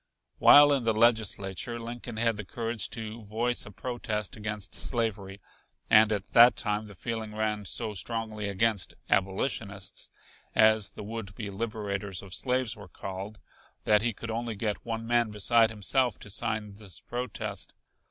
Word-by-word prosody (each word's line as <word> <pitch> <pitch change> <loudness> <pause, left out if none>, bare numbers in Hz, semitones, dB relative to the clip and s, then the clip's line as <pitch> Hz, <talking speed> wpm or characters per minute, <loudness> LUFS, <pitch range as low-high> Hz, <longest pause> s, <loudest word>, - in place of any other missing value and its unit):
While 145 0 +9
in 135 -3 +1
the 115 -1 +2
Legislature 110 0 +1
Lincoln 120 0 -6
had 115 0 +2
the 110 - -4
courage 115 -1 -3
to 110 0 -6
voice 115 +3 -1
a - - -9
protest 110 -2 -3
against 105 -1 -4
slavery, 100 -5 0 0.5
and 110 0 +7
at 100 -2 -2
that 120 +1 +8
time 105 -1 -1
the 100 - -12
feeling 110 +1 -4
ran 105 -2 -1
so 110 +1 -2
strongly 110 0 -3
against 100 0 0 0.2
"abolitionists," 100 0 -1 0.5
as 110 -2 +5
the 100 - -9
would 105 -2 -6
be 105 -3 -5
liberators 100 -3 -3
of 95 -2 -10
slaves 125 0 0
were 100 -3 -12
called, 95 +4 -7 0.5
that 105 -1 +4
he 120 +1 +1
could 115 +2 -6
only 115 0 -3
get 105 0 -2
one 115 -1 -4
man 120 -1 +2
beside 110 +2 +3
himself 110 +3 +1
to 100 - -9
sign 105 0 -2
this 100 -5 -7
protest. 110 -5 -5
110 Hz, 155 wpm, -29 LUFS, 100-115 Hz, 0.5 s, While